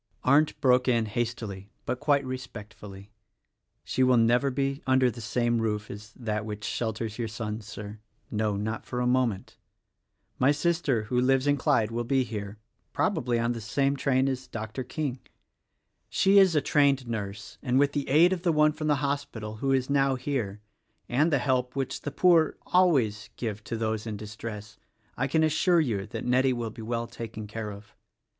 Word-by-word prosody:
Arndt 150 +4 +3
broke 125 -1 +4
in 115 -3 +3
hastily 110 -3 -4 0.2
but 125 +1 -2
quite 145 -2 +2
respectfully, 105 -5 -8 0.7
"She 130 - -2
will 130 -1 +5
never 120 +4 +3
be 135 +2 -1
under 130 -1 +4
the 120 - -9
same 120 +1 0
roof 105 -1 -2
as 105 +2 -10
that 110 -3 -3
which 105 -1 -6
shelters 110 0 -3
your 115 - -1
son, 110 0 -5
Sir 105 0 -8 0.2
— - - -38
no: 105 -2 +1
not 110 +2 -3
for 125 - -4
a 125 - 0
moment. 125 -5 0 0.8
My 130 +3 +5
sister, 150 -6 +1
who 125 +3 0
lives 135 +1 +3
in 145 0 +3
Clyde, 115 -5 +1
will 120 0 -3
he 135 -1 +3
here 105 -3 -6 0.2
— - - -46
probably 120 -1 0
on 115 +1 +1
the 115 -1 -4
same 135 +5 0
train 135 -1 +1
as 130 -1 -3
Dr. 110 +3 -5
King. 130 0 -3 0.9
She 195 +1 +5
is 190 -4 +5
a 150 - +4
trained 140 -3 +2
nurse, 105 -2 -5
and 130 -2 +1
with 140 +1 +4
the 145 -1 -3
aid 165 +6 +5
of 180 - -3
the 175 -2 +2
one 150 -1 +4
from 155 0 -4
the 150 - +4
hospital, 140 -7 -4
who 135 +4 0
is 130 -1 +2
now 135 -1 +2
here, 120 -7 -3 0.5
and 150 +7 +2
the 145 - +4
help 125 -1 0
which 135 -1 -3
the - - -3
poor 165 +1 +4
always 135 - +2
give 110 -3 -4
to 115 - -3
those 110 0 -2
in 105 -2 -4
distress, 105 0 -8 0.4
I 135 - 0
can 160 +3 +2
assure 165 +3 +3
you 110 -11 -1
that 110 - -6
Nettie 130 +1 +3
will 120 -2 -3
be 115 - -10
well 115 +1 -2
taken 115 -2 -7
care 105 0 -5
of." 100 +1 -12
125 Hz, 190 wpm, -27 LUFS, 110-140 Hz, 0.9 s, will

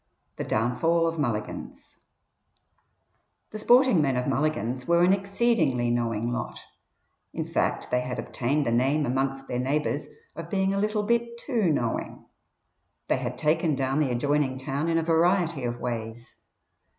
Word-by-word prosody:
THE - - -3
DOWNFALL 160 +10 +1
OF 165 -1 -2
MULLIGAN'S 115 -7 -4 1.5
The 215 - -6
sporting 245 -4 +5
men 135 -3 +1
of 125 - -1
Mulligan's 130 -3 -1
were 170 0 +4
an 185 +2 +5
exceedingly 195 - +1
knowing 115 -1 -1
lot; 120 -2 -4 0.7
in - - -3
fact, - - -1
they 125 - +2
had 125 0 -4
obtained 140 +4 -1
the - - 0
name 135 +6 +2
amongst 135 +1 -1
their 125 - -2
neighbours 145 +3 -1 0.3
of 165 0 -7
being 190 0 +1
a 195 - 0
little 210 +1 0
bit 235 +2 0
too 230 - 0
knowing. 120 -6 -2 0.8
They - - +3
had 125 -1 -4
"taken 155 +1 +1
down" 135 +2 0
the 150 -4 +2
adjoining 135 +2 0
town 140 +4 -2
in 165 - +2
a 165 - +1
variety 170 -3 +2
of 120 0 -3
ways. 115 -1 -5
145 Hz, 150 wpm, -26 LUFS, 125-170 Hz, 1.5 s, sporting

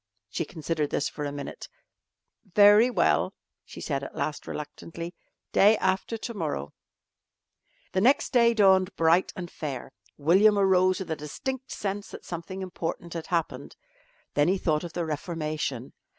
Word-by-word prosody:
She 165 - -2
considered 155 -2 -2
this - - 0
for 150 - -5
a 145 - -3
minute. 140 0 -7 0.9
"Very 210 +3 +7
well," 250 - +2 0.3
she - - -11
said 140 -3 -2
at - - -8
last 150 - -3
reluctantly, 165 +3 -7 0.4
"day 210 +2 +6
after 190 +4 0
to 235 +2 -6
morrow." 150 - -3 1.2
The 185 - +1
next 265 +6 +3
day 235 -2 +5
dawned 190 -2 +4
bright 165 +3 +3
and 175 -2 -6
fair. 135 -5 -5 0.3
William 195 +8 +5
arose 185 -1 +4
with 180 - -5
a - - +1
distinct 260 - -5
sense 200 0 -4
that - - -10
something 180 +3 -6
important 170 -2 -5
had 165 -2 -5
happened. 170 -3 -2 0.6
Then 145 +1 +3
he 190 +2 +3
thought 155 -4 0
of 170 -1 -7
the 175 - -2
reformation. 155 -5 -3
175 Hz, 150 wpm, -27 LUFS, 155-195 Hz, 1.2 s, Very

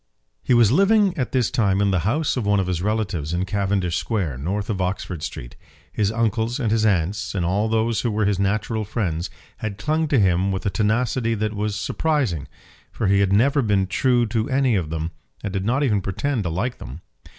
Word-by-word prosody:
He 125 - +2
was 115 -3 +5
living 195 - +4
at 130 -7 -2
this 125 -4 +1
time 100 -7 +2
in 100 -1 +2
the 95 - +2
house 150 +5 0
of 125 - -1
one 100 0 +2
of 95 - 0
his 90 -2 -2
relatives 95 -7 -1
in 90 +2 0
Cavendish 95 -3 0
Square, 90 - -2
north 100 +8 -2
of 100 -4 -2
Oxford 90 -2 -3
Street. - - -7 0.4
His 105 -1 +1
uncles 115 +2 0
and 115 -5 0
his 110 0 +3
aunts, 95 +1 0
and 90 -3 0
all 100 +5 +1
those 115 0 +1
who 120 - 0
were 105 -1 0
his 100 -2 +1
natural 110 +3 0
friends, 95 -6 -2 0.3
had 110 -3 -5
clung 155 +9 0
to 140 -4 +2
him 95 0 +2
with 95 -1 -3
a 100 - +1
tenacity 115 +2 0
that 110 0 -2
was 105 0 -2
surprising; 115 - -1 0.4
for 115 - -3
he 100 0 +3
had 100 -1 +2
never 135 +8 +3
been 100 -5 +2
true 120 +5 +2
to 110 +3 -1
any 135 -2 +2
of 90 -7 0
them, 80 +1 -3 0.3
and 100 -3 -3
did 95 -1 -2
not 130 +6 +1
even 105 -7 +2
pretend 115 +7 -2
to - - 0
like 105 +10 -2
them. 70 +7 -9
105 Hz, 215 wpm, -22 LUFS, 95-115 Hz, 0.4 s, was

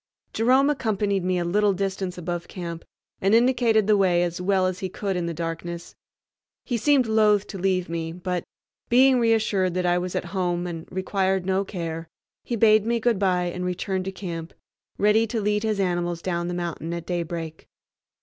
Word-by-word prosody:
Jerome 260 +5 +4
accompanied 205 -7 0
me 185 0 +1
a 175 - -1
little 205 +3 +2
distance 190 -1 -3
above 175 0 -4
camp 170 -3 -6 0.4
and 195 +3 +4
indicated 235 -3 +3
the 210 +1 +4
way 180 -3 +3
as 175 0 -3
well 190 0 +2
as 185 0 -2
he 190 - -3
could 195 +1 -3
in 175 -1 -1
the - - -2
darkness. 170 +1 -5 0.7
He 245 - -1
seemed 270 +2 +3
loath 215 -2 +3
to 195 - -8
leave 185 -1 +1
me, 165 -1 -3
but, 180 0 -3 0.5
being 255 +1 +5
reassured 215 -6 +2
that 180 0 0
I 175 0 +3
was 180 0 -4
at - - -1
home 175 -2 0
and 165 -2 -6
required 190 0 0
no 190 +1 +1
care, 165 -4 -5 0.4
he 240 - -3
bade 215 -1 +5
me 235 +1 0
good 230 -3 +1
bye 180 -3 +1
and 180 - -4
returned 185 +1 -2
to 195 - -3
camp, 170 -3 -6 0.4
ready 215 +2 +3
to 225 +1 -2
lead 210 0 +1
his 215 -2 -1
animals 175 -2 -1
down 175 -2 -1
the 175 - -3
mountain 170 -2 -4
at 170 -1 -6
daybreak. 170 -2 -4
185 Hz, 190 wpm, -24 LUFS, 175-210 Hz, 0.7 s, being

